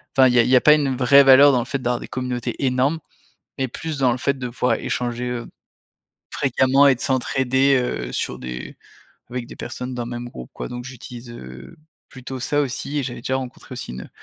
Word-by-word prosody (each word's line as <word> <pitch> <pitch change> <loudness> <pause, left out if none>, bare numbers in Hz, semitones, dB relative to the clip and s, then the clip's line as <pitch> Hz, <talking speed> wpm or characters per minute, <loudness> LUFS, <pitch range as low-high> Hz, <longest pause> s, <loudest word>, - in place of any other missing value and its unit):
Enfin 130 -1 +7
il 125 - +2
y - - +6
a - - +6
il 125 - -1
y 130 - +5
a 125 - +6
pas 150 - +7
une 140 -3 +1
vraie 135 +2 +6
valeur 135 +1 +8
dans 130 - +2
le 120 - -2
fait 135 +2 -3
d'avoir 120 -1 -1
des - - -8
communautés 125 0 -4
énormes, 130 +5 +1 0.6
mais 135 -1 0
plus 155 +4 -5
dans 130 -3 +3
le 130 - -3
fait 140 +1 -1
de 125 -1 -4
pouvoir 125 +1 0
échanger, 125 0 -3
heu, 120 -1 -4 0.8
fréquemment 135 +1 +3
et 135 - +5
de 125 - -16
s'entraider, 130 +1 +2
heu, 60 - -2
sur - - -3
des 60 0 -7 0.5
avec 125 -1 -4
des - - -11
personnes 125 +1 -6
dans 120 -1 -4
le - - -7
même 120 0 -6
groupe, 65 - -10
quoi. - - -6
Donc 125 0 -7
j'utilise, 125 -1 -10
heu, 65 - -11 0.3
plutôt 130 0 -8
ça 145 +4 +1
aussi 140 +2 -3
et - - -2
j'avais 120 -2 -6
déjà 130 - -1
rencontré 125 -2 -8
aussi - - -7
une, 65 +1 -7
heu, - - -14
125 Hz, 230 wpm, -22 LUFS, 120-135 Hz, 0.8 s, valeur